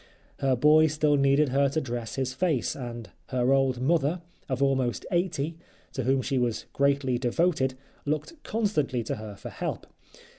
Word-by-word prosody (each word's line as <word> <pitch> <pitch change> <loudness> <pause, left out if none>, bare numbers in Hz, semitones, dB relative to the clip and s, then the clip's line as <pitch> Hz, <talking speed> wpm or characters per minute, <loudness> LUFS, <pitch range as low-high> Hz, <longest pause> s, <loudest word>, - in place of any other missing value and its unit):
Her 135 -1 +2
boy 150 +5 +6
still 150 -1 +2
needed 140 +1 +3
her 140 +2 +3
to 145 - 0
dress 120 -5 -4
his 130 -1 -2
face, 150 -4 0
and 120 -4 -7 0.2
her 125 +1 +2
old 135 -2 +2
mother, 160 +4 +1 0.3
of 130 -1 -1
almost 130 -8 0
eighty, 165 -3 -1 0.3
to 130 - -2
whom 130 0 +2
she 135 0 0
was 120 -2 -1
greatly 140 -3 +1
devoted, 130 +1 +1 0.3
looked 155 - -3
constantly 195 - 0
to 115 - -3
her 105 -1 -8
for 95 - -8
help. - - -4
135 Hz, 160 wpm, -27 LUFS, 125-150 Hz, 0.3 s, boy